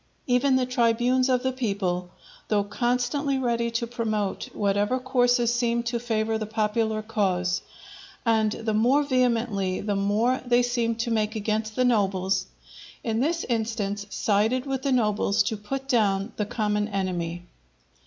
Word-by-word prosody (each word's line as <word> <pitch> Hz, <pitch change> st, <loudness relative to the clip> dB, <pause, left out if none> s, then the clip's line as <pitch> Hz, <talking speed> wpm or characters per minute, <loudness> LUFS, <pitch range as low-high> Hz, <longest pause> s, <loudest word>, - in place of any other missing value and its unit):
Even 255 Hz, +2 st, +3 dB
the 260 Hz, -1 st, +2 dB
tribunes 250 Hz, +1 st, +2 dB
of 250 Hz, -1 st, +2 dB
the 260 Hz, -, +1 dB
people, 195 Hz, -8 st, -2 dB, 0.4 s
though 205 Hz, -2 st, +2 dB
constantly 250 Hz, +6 st, 0 dB
ready 235 Hz, -2 st, 0 dB
to 235 Hz, +1 st, -1 dB
promote 220 Hz, -4 st, -2 dB
whatever 205 Hz, +4 st, +1 dB
courses 245 Hz, -2 st, +2 dB
seemed 235 Hz, 0 st, 0 dB
to 235 Hz, 0 st, -1 dB
favour 220 Hz, -1 st, -1 dB
the 215 Hz, -, -4 dB
popular 220 Hz, 0 st, 0 dB
cause, 190 Hz, -5 st, 0 dB, 0.6 s
and 220 Hz, -2 st, +3 dB
the 220 Hz, 0 st, -2 dB
more 250 Hz, +7 st, +3 dB
vehemently 235 Hz, -8 st, +1 dB
the 205 Hz, 0 st, -2 dB
more 210 Hz, +6 st, +1 dB
they 245 Hz, 0 st, +3 dB
seemed 235 Hz, -2 st, -1 dB
to 235 Hz, 0 st, -2 dB
make 215 Hz, 0 st, 0 dB
against 215 Hz, 0 st, -2 dB
the 255 Hz, -, +2 dB
nobles, 190 Hz, -4 st, +1 dB, 0.6 s
in 225 Hz, -1 st, -1 dB
this 330 Hz, +6 st, 0 dB
instance 215 Hz, -3 st, -2 dB
sided 220 Hz, +6 st, +1 dB
with 270 Hz, -1 st, -2 dB
the 275 Hz, -, -1 dB
nobles 210 Hz, -4 st, +2 dB
to 220 Hz, -, -2 dB
put 265 Hz, +6 st, -5 dB
down 210 Hz, -5 st, +1 dB
the 210 Hz, -, -2 dB
common 210 Hz, -1 st, 0 dB
enemy. 175 Hz, -4 st, -3 dB
225 Hz, 150 wpm, -25 LUFS, 205-245 Hz, 0.6 s, Even